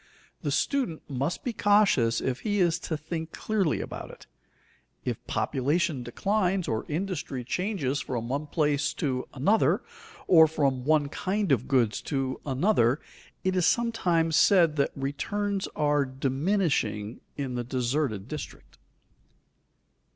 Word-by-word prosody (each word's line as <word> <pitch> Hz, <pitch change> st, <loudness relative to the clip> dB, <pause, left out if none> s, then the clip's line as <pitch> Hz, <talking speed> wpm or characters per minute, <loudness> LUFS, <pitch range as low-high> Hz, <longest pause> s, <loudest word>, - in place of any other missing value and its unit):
The -, -, -2 dB
student 255 Hz, -, -1 dB
must 140 Hz, +4 st, -2 dB
be 245 Hz, -, -2 dB
cautious 205 Hz, -, +3 dB
if 130 Hz, -1 st, -1 dB
he 205 Hz, -1 st, -1 dB
is 175 Hz, -2 st, +2 dB
to 160 Hz, -3 st, -3 dB
think 160 Hz, +1 st, -5 dB
clearly 200 Hz, -8 st, 0 dB
about -, -, -7 dB
it. -, -, -13 dB, 0.8 s
If -, -, -3 dB
population 145 Hz, +2 st, 0 dB
declines, 190 Hz, -, 0 dB
or 110 Hz, -1 st, -2 dB
industry 155 Hz, -6 st, -3 dB
changes 150 Hz, -, -1 dB
from 120 Hz, -4 st, -4 dB
one 140 Hz, +4 st, -2 dB
place 145 Hz, -2 st, 0 dB
to 130 Hz, -4 st, -2 dB
another, 200 Hz, +12 st, +2 dB, 0.4 s
or 160 Hz, -3 st, +7 dB
from 135 Hz, -5 st, 0 dB
one 150 Hz, -1 st, +3 dB
kind 195 Hz, +2 st, -1 dB
of 125 Hz, -2 st, +2 dB
goods 120 Hz, -6 st, +2 dB
to 135 Hz, -3 st, -2 dB
another, 135 Hz, -, +2 dB, 0.4 s
it 185 Hz, 0 st, +1 dB
is 180 Hz, -1 st, +3 dB
sometimes 175 Hz, -9 st, +1 dB
said 170 Hz, -4 st, +5 dB
that 140 Hz, -, +2 dB
returns 195 Hz, +9 st, -2 dB
are 145 Hz, -1 st, +2 dB
diminishing 135 Hz, -, -1 dB, 0.2 s
in 135 Hz, -3 st, -3 dB
the 120 Hz, 0 st, -2 dB
deserted 125 Hz, -3 st, -1 dB
district. 150 Hz, +1 st, -8 dB
150 Hz, 130 wpm, -27 LUFS, 130-185 Hz, 0.8 s, or